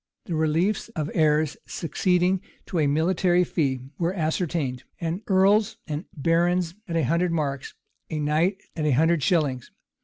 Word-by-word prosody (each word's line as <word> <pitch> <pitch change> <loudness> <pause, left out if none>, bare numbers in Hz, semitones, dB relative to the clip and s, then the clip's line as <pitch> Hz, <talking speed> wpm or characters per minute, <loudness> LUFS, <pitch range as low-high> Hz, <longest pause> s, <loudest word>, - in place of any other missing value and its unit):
The 175 - -4
reliefs 165 +8 +1
of 155 -2 -2
heirs 155 -1 +2
succeeding 180 +2 +1 0.2
to 175 - -2
a 150 - +3
military 175 +4 +2
fee 135 -7 -1 0.2
were 175 +2 0
ascertained; 155 -6 -1 0.2
an 170 +3 -2
earl's 200 +3 +3
and 155 +2 -4
baron's 170 +3 +1
at 170 - -3
a 165 - +2
hundred 170 +6 +1
marks, 140 -4 -2 0.3
a 155 - -3
knight's 155 +6 0
at 155 - -2
a - - +3
hundred 160 +4 +3
shillings. 140 -7 +1
165 Hz, 150 wpm, -25 LUFS, 150-180 Hz, 0.3 s, a